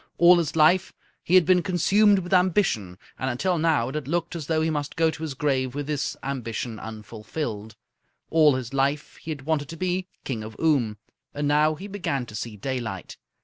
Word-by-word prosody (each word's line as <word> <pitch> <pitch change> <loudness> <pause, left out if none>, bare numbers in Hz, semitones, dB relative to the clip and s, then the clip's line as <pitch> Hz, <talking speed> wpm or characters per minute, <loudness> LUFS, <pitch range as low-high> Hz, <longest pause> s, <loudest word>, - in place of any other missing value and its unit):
All 175 +1 +7
his 160 -2 -2
life 170 +4 +4 0.3
he 180 - +1
had 185 -3 +7
been 180 +1 +4
consumed 195 +4 +4
with 180 0 -3
ambition, 175 - +2 0.2
and 130 - -1
until 170 +8 0
now 155 -7 +2
it - - -7
had 150 -3 -4
looked 170 +2 -2
as 155 -4 -5
though 160 -1 +1
he 160 - +1
must 145 -2 -3
go 165 -1 +3
to 160 - -10
his 155 -4 -4
grave 130 -2 0
with 145 0 -3
this 145 -1 -2
ambition 120 -4 -4
unfulfilled. 110 +1 -6 0.6
All 155 -4 +5
his 130 -1 -5
life 140 +2 -1
he - - -11
had 145 -4 -4
wanted 145 -2 -1
to 165 - -7
be 185 +1 -1 0.2
King 115 -5 -4
of 110 +1 -9
Oom, 130 -10 +2 0.4
and 145 0 -1
now 150 +2 +3
he 185 - -9
began 180 -10 -3
to 110 - -12
see 110 0 -5
daylight. 115 -5 -4
150 Hz, 200 wpm, -25 LUFS, 125-165 Hz, 0.6 s, All